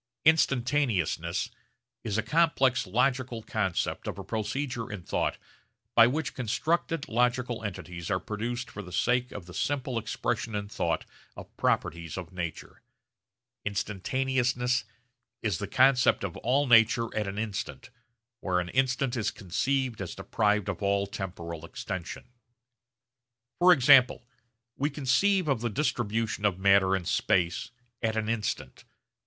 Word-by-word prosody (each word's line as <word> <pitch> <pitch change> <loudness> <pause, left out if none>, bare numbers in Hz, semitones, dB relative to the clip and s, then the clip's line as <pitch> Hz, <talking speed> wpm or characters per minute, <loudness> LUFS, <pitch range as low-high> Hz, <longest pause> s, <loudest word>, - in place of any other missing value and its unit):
Instantaneousness 120 - +2 0.5
is 110 -2 -2
a 110 - +1
complex 135 - +2
logical 125 +2 0
concept 105 -6 -2
of - - -4
a - - -6
procedure 120 +1 -3
in 100 -4 -6
thought - - -1 0.6
by 115 0 +7
which 150 +4 -2
constructed 155 +6 -1
logical 120 0 0
entities 90 -4 -6
are 95 - +1
produced 120 +6 -4
for 105 - -6
the 90 -2 -11
sake 125 +5 +1
of 100 -4 -8
the 90 - -11
simple 130 +2 -1
expression 110 0 -2
in 100 0 -3
thought - - -1 0.3
of - - -11
properties 85 0 -1
of 95 0 -7
nature. 85 -3 -6 0.8
Instantaneousness 125 +5 0 0.6
is 105 -7 0
the 100 - -3
concept 130 +2 +4
of 95 -3 -4
all 135 +5 +2
nature 115 -1 +4
at 105 -2 -1
an 100 +1 -5
instant, 105 +1 -4 0.5
where 90 -2 0
an 90 0 -3
instant 130 0 +1
is 110 -3 0
conceived 120 +4 -1
as 90 - -5
deprived 105 -2 0
of - - -3
all 100 0 +1
temporal 85 -4 -6
extension. 85 +1 -6 1.4
For 180 +1 +7
example 130 -5 +6 0.5
we 145 +2 0
conceive 155 +7 +2
of 135 -6 +1
the 120 - 0
distribution 115 -4 -1
of 100 -4 +2
matter 95 0 +4
in 95 -2 -3
space 85 +2 +1 0.3
at 110 -1 0
an 110 0 -1
instant. 105 - -3
115 Hz, 135 wpm, -28 LUFS, 100-130 Hz, 1.4 s, by